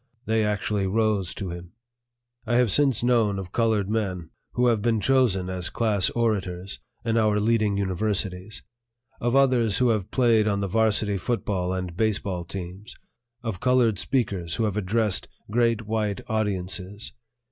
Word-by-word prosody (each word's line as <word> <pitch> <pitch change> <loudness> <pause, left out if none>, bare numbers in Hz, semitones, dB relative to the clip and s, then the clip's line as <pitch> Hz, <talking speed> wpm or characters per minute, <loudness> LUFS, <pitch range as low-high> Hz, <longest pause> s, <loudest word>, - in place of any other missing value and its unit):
They 110 0 +1
actually 105 -1 0
rose 105 -2 +1
to 95 -3 -4
him. 85 0 -9 0.7
I 120 - +1
have 120 -3 +3
since 135 -4 +3
known 115 -5 +2
of 95 -2 -6
colored 110 -4 +1
men 95 -6 -2 0.2
who 125 - +2
have 115 -4 +3
been 115 0 +1
chosen 105 -5 +2
as 90 -1 -3
class 105 -5 +2
orators 100 -5 -1 0.3
in 115 0 +1
our 105 -2 +3
leading 105 -2 +2
universities, 100 0 -2 0.6
of 120 +2 0
others 125 -6 +3
who 125 -1 +3
have 105 -4 0
played 115 -4 +3
on 100 -1 +1
the 100 - -1
varsity 105 -1 +2
football 95 -4 -1
and 90 -2 -4
baseball 100 -4 -1
teams, 95 +4 -8 0.5
of 110 -6 -4
colored 120 -5 +3
speakers 100 -8 -1
who 115 - -1
have 105 -3 0
addressed 105 0 0 0.2
great 115 -1 +2
white 105 -2 -1
audiences. 100 -1 -2
105 Hz, 150 wpm, -25 LUFS, 95-115 Hz, 0.7 s, have